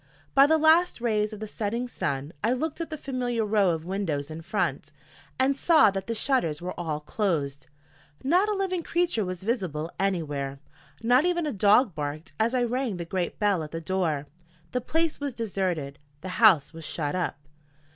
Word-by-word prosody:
By 275 +1 +7
the 320 +1 +4
last 320 +2 +4
rays 215 -3 +1
of 215 - -8
the - - -3
setting 225 +3 -3
sun 140 - -3
I 230 +3 +3
looked 310 +5 -3
at 335 - -4
the 310 - -5
familiar 245 -5 -2
row 205 -3 +3
of 165 -1 -2
windows 165 -6 -2
in 160 +1 -6
front, 165 - -2 0.5
and 265 +1 +3
saw 310 - +5
that 195 0 -4
the 230 - -2
shutters 215 - +1
were 180 +1 -5
all 155 -3 -3
closed. 150 -6 -2 0.6
Not 360 +10 +3
a - - +1
living 380 -2 -1
creature 340 -9 0
was 185 -1 -5
visible 175 - -2
anywhere. 150 -8 -1 0.5
Not 245 +4 +5
even 345 -2 +1
a 295 - -2
dog 210 +2 +4
barked 150 0 -5
as 230 +3 +2
I 250 - +2
rang 240 -4 -1
the 170 - -5
great 180 0 -2
bell 205 -5 +2
at 155 - -6
the 165 - -5
door. 165 -4 -1 0.5
The 250 - -1
place 325 +5 0
was 285 -2 -3
deserted; 185 -11 -2 0.2
the 185 - -6
house 185 -7 +5
was 165 0 -9
shut 150 -2 -2
up. 180 -5 -1
205 Hz, 185 wpm, -27 LUFS, 165-255 Hz, 0.6 s, By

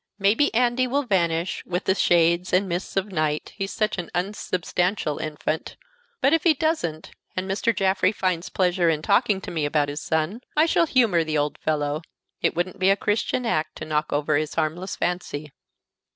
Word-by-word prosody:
Maybe 210 +9 +3
Andy 245 +1 +2
will 280 +3 0
vanish 170 -6 0
with 180 +1 -3
the 190 - +2
shades 170 -1 +3
and 190 +2 +3
mists 180 +2 -3
of 195 +1 -1
night, 155 -3 -1
he's 195 0 -3
such 215 -3 -1
an 175 - -5
unsubstantial 180 -3 -1
infant; 155 +1 -3 0.4
but 275 - +4
if 325 -2 +3
he 330 -3 +5
doesn't, 265 - -1 0.2
and 185 +1 -2
Mr. 200 +4 +1
Jaffrey 190 -2 +2
finds 185 -4 -1
pleasure 180 -2 +2
in 155 -1 0
talking 215 -6 +3
to - - -7
me 160 -3 -2
about 145 0 +1
his 145 +1 -5
son, 160 +8 -1 0.2
I 310 - +6
shall 335 0 +2
humor 225 - +3
the 155 -1 -1
old 145 0 -1
fellow. 150 -1 -1 0.4
It - - +1
wouldn't 175 +3 -2
be 190 +1 +4
a 195 - +5
Christian 220 +4 0
act 155 -8 -1
to 155 - -6
knock 150 -1 -1
over 145 0 +1
his 155 0 -2
harmless 165 +4 -2
fancy." 155 -4 -3
180 Hz, 185 wpm, -24 LUFS, 155-205 Hz, 0.4 s, I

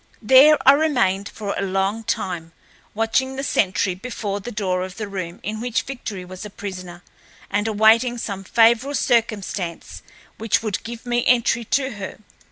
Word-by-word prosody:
There 270 +7 +7
I - - +12
remained 240 -10 +1
for 205 -2 -5
a - - -2
long 195 +3 -1
time, 175 -7 -3 0.4
watching 245 +4 0
the 270 - -4
sentry 190 -6 +1
before 200 0 -4
the 240 +5 -7
door 190 -4 -1
of 185 0 -6
the 215 -2 -4
room 185 -3 -6
in 215 +2 -4
which 240 -1 -1
Victory 215 -8 -6
was 185 +1 -9
a 210 - -7
prisoner, 185 -3 -8 0.5
and 205 +2 0
awaiting 225 +3 +4
some 200 -4 -5
favorable 235 +7 +3
circumstance 205 -8 -1 0.4
which 225 0 +1
would 215 -3 -2
give 230 +1 -8
me 240 0 0
entry 235 -1 +3
to 270 +3 0
her. 190 -2 -7
215 Hz, 165 wpm, -22 LUFS, 190-240 Hz, 0.5 s, I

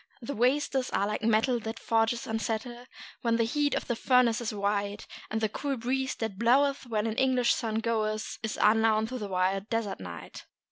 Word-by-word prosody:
The 255 +3 -5
wastes 260 +2 +1
are 200 - +1
like 210 +1 -2
metal 230 +3 +2
that 225 0 -5
forges 225 +1 +1
unsettle 225 +2 -3 0.3
When 230 -1 +2
the 230 - +2
heat 290 +5 +1
of - - -2
the 240 - -1
furnace 245 -1 +3
is 235 - -2
white; 205 0 -2 0.2
And 220 +1 -2
the 220 - +2
cool 275 +5 -3
breeze 265 +3 -1
that 220 -4 -4
bloweth 270 +3 +3
when 215 -2 -1
an 225 -1 -2
English 255 -2 +3
sun 220 -2 -2
goeth, 220 -1 -1
Is 220 -1 -3
unknown 220 0 +4
to 255 0 -4
the 210 - -4
wild 190 +2 0
desert 225 -3 -2
night. 85 -3 -9
225 Hz, 190 wpm, -29 LUFS, 215-250 Hz, 0.3 s, unknown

